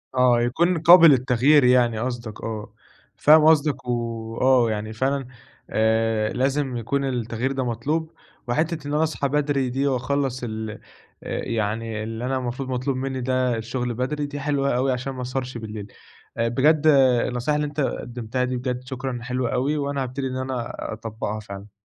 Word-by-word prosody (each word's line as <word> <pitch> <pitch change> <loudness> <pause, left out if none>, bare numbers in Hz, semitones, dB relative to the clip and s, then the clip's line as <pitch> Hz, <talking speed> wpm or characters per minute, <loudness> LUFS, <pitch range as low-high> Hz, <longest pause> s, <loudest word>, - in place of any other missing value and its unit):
آه، 125 -2 +4
يكون 165 +9 +1
قابل 170 +1 +8
للتغيير 130 +2 +4
يعني 125 -3 +4
قصدك 120 -2 -5
آه، 110 -2 -5 0.4
فاهم 155 +1 +6
قصدك 150 -4 +3
وآه 115 +1 +1
يعني 110 +1 -4
فعلًا 135 +3 -1 0.4
آآ، 110 0 +1
لازم 135 0 0
يكون 130 +5 -1
التغيير 120 0 -2
ده 135 -1 -1
مطلوب 150 +8 -2 0.4
وحتِّة 155 +4 -1
إن 145 - -3
أنا 150 +1 +2
اصحى 155 -3 -1
بدري 140 -2 0
دي 135 +3 0
وأخلَّص 130 0 -1
ال 110 -1 -4 0.5
آآ، - - -4
يعني 110 0 -2
اللي 115 +2 -5
أنا 130 +1 0
المفروض 130 +1 -4
مطلوب 130 +1 -1
مني 130 0 -3
ده 130 -1 0
الشغل 120 +2 -3
بدري، 145 +5 -2
دي 145 0 -6
حلوة 140 -2 0
اوي 130 +1 +1
عشان 130 +2 -3
ما 130 - -6
اسهرش 125 0 -4
بالليل، 105 -2 -8 0.4
بجد 145 +7 +2 0.4
النصيحة 125 +4 -1
اللي 150 0 0
أنت 145 +1 -7
قدّمتها 120 -2 -2
دي 125 0 -1
بجد 125 0 -3
شكرًا، 130 -1 -4
حلوة 125 0 -2
اوي 140 +5 0
وأنا 140 -1 -1
هابتدي 130 +2 -4
إن 130 0 -4
أنا 130 -2 -4 0.2
اطبقها 110 -1 -5
فعلًا. 100 -1 -10
125 Hz, 160 wpm, -23 LUFS, 115-140 Hz, 0.5 s, قابل